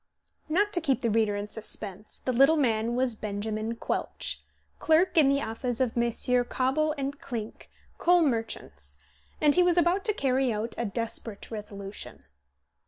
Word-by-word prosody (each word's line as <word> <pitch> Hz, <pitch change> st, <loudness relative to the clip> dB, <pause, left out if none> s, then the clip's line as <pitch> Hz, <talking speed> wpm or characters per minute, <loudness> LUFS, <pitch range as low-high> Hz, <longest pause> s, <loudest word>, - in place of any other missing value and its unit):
Not 410 Hz, +6 st, +2 dB
to 350 Hz, -, +3 dB
keep 275 Hz, -5 st, +1 dB
the 230 Hz, -, +1 dB
reader 215 Hz, -1 st, +2 dB
in 205 Hz, 0 st, -3 dB
suspense, 210 Hz, -2 st, -3 dB
the 255 Hz, -, -2 dB
little 275 Hz, +6 st, +5 dB
man 230 Hz, -4 st, +1 dB
was 255 Hz, -1 st, +1 dB
Benjamin 215 Hz, +2 st, -3 dB
Quelch, -, -, -3 dB, 0.4 s
clerk 325 Hz, +4 st, +3 dB
in 310 Hz, -4 st, +6 dB
the 275 Hz, +1 st, +2 dB
office 235 Hz, +2 st, -3 dB
of 255 Hz, -3 st, 0 dB
Messrs. 240 Hz, +1 st, +2 dB
Cobble 300 Hz, +4 st, +1 dB
& 280 Hz, -, -11 dB
Clink, 225 Hz, -4 st, -6 dB, 0.3 s
coal 355 Hz, -1 st, +5 dB
merchants, 70 Hz, -, -2 dB, 0.4 s
and 300 Hz, -1 st, +4 dB
he 360 Hz, -, +5 dB
was 355 Hz, -1 st, +3 dB
about 350 Hz, +3 st, +3 dB
to 425 Hz, -, +3 dB
carry 265 Hz, -, +1 dB
out 220 Hz, +2 st, -2 dB
a 235 Hz, -, -2 dB
desperate 225 Hz, 0 st, -3 dB
resolution. 205 Hz, -2 st, -7 dB
240 Hz, 160 wpm, -28 LUFS, 215-290 Hz, 0.4 s, in